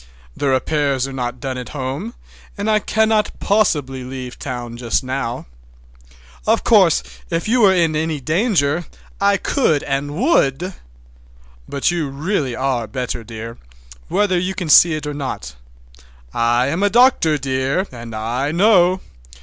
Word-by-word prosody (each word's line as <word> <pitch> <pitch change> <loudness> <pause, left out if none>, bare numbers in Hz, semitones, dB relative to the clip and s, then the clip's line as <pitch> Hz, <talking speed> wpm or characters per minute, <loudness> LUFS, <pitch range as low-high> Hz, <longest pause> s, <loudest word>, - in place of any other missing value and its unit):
"The 145 - -2
repairs 135 0 +1
are 135 - -7
not 125 -1 -4
done 130 -1 -4
at 125 - -7
home, 140 - -4 0.4
and 205 +2 0
I 215 - +4
cannot 220 0 +1
possibly 145 -11 +1
leave 130 -1 -7
town 120 -3 -5
just 120 +1 -1
now. 130 -2 -3 1.0
Of - - +3
course 60 - +4 0.3
if 165 +3 -2
you 240 +2 +3
were 195 -3 +6
in 165 -3 +2
any 155 -1 -1
danger 165 - +1 0.3
I 200 0 +4
could 175 - +1
and 140 +1 -2
would, 180 - +1 1.0
but 140 +4 +1
you 165 -5 -2
really 140 -2 -2
are 130 -4 -1
better, 125 0 -4
dear, 115 +1 -8 0.5
whether 190 -4 +1
you 185 +2 -2
can 175 -4 -4
see 165 +1 +7
it 155 - -5
or 150 - -3
not. 140 - -5 0.8
I 120 +1 +2
am 165 +6 -1
a 205 - +3
doctor, 235 - +4
dear, 135 +6 -1
and 115 -2 -8
I 120 +6 -2
know. 185 0 +4
145 Hz, 150 wpm, -19 LUFS, 130-185 Hz, 1.0 s, see